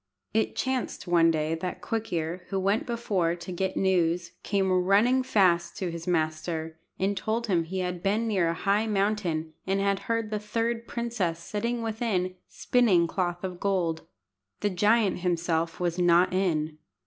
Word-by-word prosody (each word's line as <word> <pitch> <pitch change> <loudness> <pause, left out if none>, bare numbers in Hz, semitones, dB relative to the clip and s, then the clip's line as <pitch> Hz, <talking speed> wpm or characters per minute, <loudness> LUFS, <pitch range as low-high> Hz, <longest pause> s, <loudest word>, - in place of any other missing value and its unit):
It 220 +1 +1
chanced 260 -5 -2
one 170 -2 +4
day 155 0 0
that 180 +3 -4
Quick 225 -1 -3
ear, 170 +1 -2
who 195 - -1
went 200 +5 +1
before 200 -8 0
to 175 +1 -8
get 190 +1 -2
news, 175 -2 +1
came 195 -2 0
running 200 +8 +4
fast 185 -9 +2
to 180 -3 -2
his 170 0 -7
master, 160 -1 -1 0.2
and 195 +2 0
told 225 +3 -1
him 175 -6 +1
he 185 +3 -3
had 180 -1 -3
been 210 +4 +1
near 190 -6 +2
a 165 - -1
high 200 +5 +1
mountain, 195 -6 0
and 195 +1 +1
had 200 0 +1
heard 230 -2 0
the 210 - -1
third 230 +2 -2
princess 230 -8 -2
sitting 230 +7 -3
within, 215 -5 -1
spinning 215 -9 +3
cloth 175 0 -2
of 180 -2 -4
gold. 180 -5 -1 0.5
The 205 - +1
giant 210 +2 +3
himself 170 -2 -1
was 175 0 -1
not 175 +1 +4
in. 155 -5 0
185 Hz, 165 wpm, -27 LUFS, 170-210 Hz, 0.5 s, one